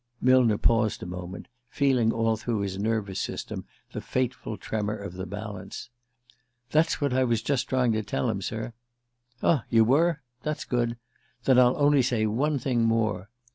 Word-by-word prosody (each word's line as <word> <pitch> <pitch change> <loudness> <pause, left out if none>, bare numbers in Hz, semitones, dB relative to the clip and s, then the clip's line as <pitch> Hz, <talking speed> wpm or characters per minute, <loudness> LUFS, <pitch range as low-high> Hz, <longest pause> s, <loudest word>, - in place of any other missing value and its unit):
Millner 125 -4 +4
paused 115 -1 +2
a - - -5
moment, 90 +1 -7 0.2
feeling 130 -5 +2
all 115 0 +1
through 110 -1 -2
his 95 -1 -3
nervous 105 -2 -1
system - - -4 0.3
the - - -5
fateful 130 -4 -2
tremor 105 -1 -3
of 100 -4 -7
the 95 0 -6
balance. 105 +1 -7 0.8
"That's 155 +2 +2
what 140 -3 0
I 130 0 +3
was 115 -3 0
just 135 -2 0
trying 125 -2 +2
to 110 0 0
tell 70 -9 -2
him, - - -1
sir 120 - -4 0.3
" 120 +1 -31
"Ah; 145 -8 +3
you 115 -1 +5
were? 150 +6 +2 0.2
That's 150 0 -3
good. 120 -1 -1 0.5
Then 130 0 +5
I'll 125 0 +5
only 145 -1 +4
say 120 -3 +1
one 140 +8 +1
thing 125 -3 0
more. 110 -4 0
115 Hz, 175 wpm, -27 LUFS, 105-130 Hz, 0.8 s, you